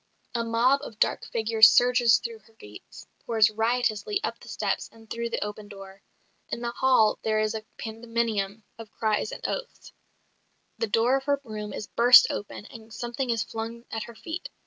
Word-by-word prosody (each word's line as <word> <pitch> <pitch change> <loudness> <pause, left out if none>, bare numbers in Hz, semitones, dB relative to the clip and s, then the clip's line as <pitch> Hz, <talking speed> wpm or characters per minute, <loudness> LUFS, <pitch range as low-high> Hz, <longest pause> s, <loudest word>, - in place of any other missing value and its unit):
A 235 - -1
mob 240 +4 +2
of 225 -7 -9
dark - - 0
figures 220 -1 +5
surges 245 -2 +5
through 235 -2 -7
her 220 +2 -25
gates, 105 - -13
pours 220 -2 +3
riotously 235 - 0
up - - -3
the - - -15
steps - - -2
and 225 -1 -18
through 235 +2 -4
the 230 - -2
open 210 0 -7
door. 195 -1 -12 0.5
In - - -4
the 235 0 -2
hall 245 -4 +3
there 215 -1 0
is 215 0 0
a 220 -1 -5
pandemonium 225 -2 -3 0.2
of 225 -2 -9
cries 215 - -1
and - - -5
oaths; - - -6 0.9
the 460 - 0
door 240 - +2
of 270 - -7
her 285 -1 +1
room 210 -3 -6
is - - -6
burst 245 +4 +7
open, 205 0 -6
and 225 0 -13
something 240 +4 -4
is 230 -2 +1
flung 230 +1 -7
at 220 -1 -4
her 235 - -12
feet. 345 - -7
225 Hz, 185 wpm, -26 LUFS, 215-240 Hz, 0.9 s, burst